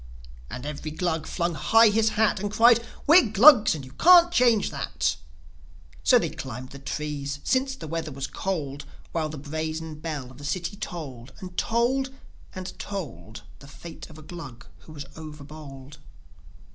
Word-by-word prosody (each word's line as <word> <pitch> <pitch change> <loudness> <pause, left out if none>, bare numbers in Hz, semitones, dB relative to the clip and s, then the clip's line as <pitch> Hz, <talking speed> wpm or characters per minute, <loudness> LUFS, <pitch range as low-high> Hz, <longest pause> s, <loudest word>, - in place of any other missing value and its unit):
And 125 +2 -7
every 150 +1 -5
Glug 160 0 -2
flung 170 -1 -1
high 225 +10 +5
his 220 +1 +2
hat, 215 -1 +3
And 205 +1 -2
cried, 235 +1 +5 0.2
"We're 310 -6 +6
Glugs! 220 - +7
and 140 -4 -7
you 130 - -13
can't 345 - +7
change 240 - +3
that!" 70 - -1 0.9
So - - +6
they - - -1
climbed 130 0 -7
the 140 - -10
trees, 145 0 -4
since 265 +1 +1
the 160 - -9
weather 160 0 -3
was 135 0 -4
cold, 145 -6 -4 0.3
While 160 -2 -1
the 155 - -7
brazen 155 +2 -5
bell 150 -6 -5
of 130 - -15
the - - -11
city 170 +6 -3
tolled 140 - -7
And 180 -1 -9
tolled, 245 +6 +1 0.5
and 185 0 -7
told 155 - -7 0.2
The 140 - -14
fate 165 +4 -11
of 155 - -13
a 155 - -12
Glug 150 -7 -10
who - - -15
was 145 -2 -8
over 155 -2 -9
bold. 140 -2 -11
160 Hz, 170 wpm, -26 LUFS, 145-210 Hz, 0.9 s, Glugs